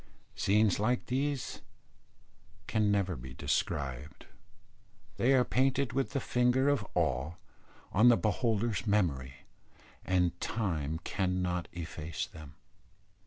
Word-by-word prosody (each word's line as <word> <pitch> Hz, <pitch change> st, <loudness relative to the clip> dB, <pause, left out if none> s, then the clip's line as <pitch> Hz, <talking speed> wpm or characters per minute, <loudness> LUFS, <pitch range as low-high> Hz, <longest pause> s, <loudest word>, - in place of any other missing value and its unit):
Scenes 105 Hz, -1 st, +2 dB
like 125 Hz, +4 st, +1 dB
these 135 Hz, +1 st, -2 dB, 1.0 s
can 105 Hz, 0 st, +1 dB
never 95 Hz, -3 st, +1 dB
be 65 Hz, 0 st, -9 dB
described. 70 Hz, +1 st, -2 dB, 0.9 s
They 130 Hz, +3 st, +3 dB
are 125 Hz, -, +5 dB
painted 130 Hz, 0 st, +1 dB
with 135 Hz, +1 st, -1 dB
the 140 Hz, -, +1 dB
finger 125 Hz, +2 st, +2 dB
of 140 Hz, -7 st, +1 dB
awe 65 Hz, +6 st, 0 dB, 0.6 s
on 110 Hz, +5 st, +6 dB
the 120 Hz, -, +6 dB
beholder's 110 Hz, +1 st, 0 dB
memory, 70 Hz, -10 st, 0 dB, 0.6 s
and 90 Hz, -1 st, +1 dB
time 80 Hz, -8 st, -1 dB
cannot 90 Hz, -2 st, -1 dB
efface 80 Hz, -1 st, -5 dB
them. 75 Hz, -3 st, -12 dB
100 Hz, 110 wpm, -31 LUFS, 80-125 Hz, 1.0 s, on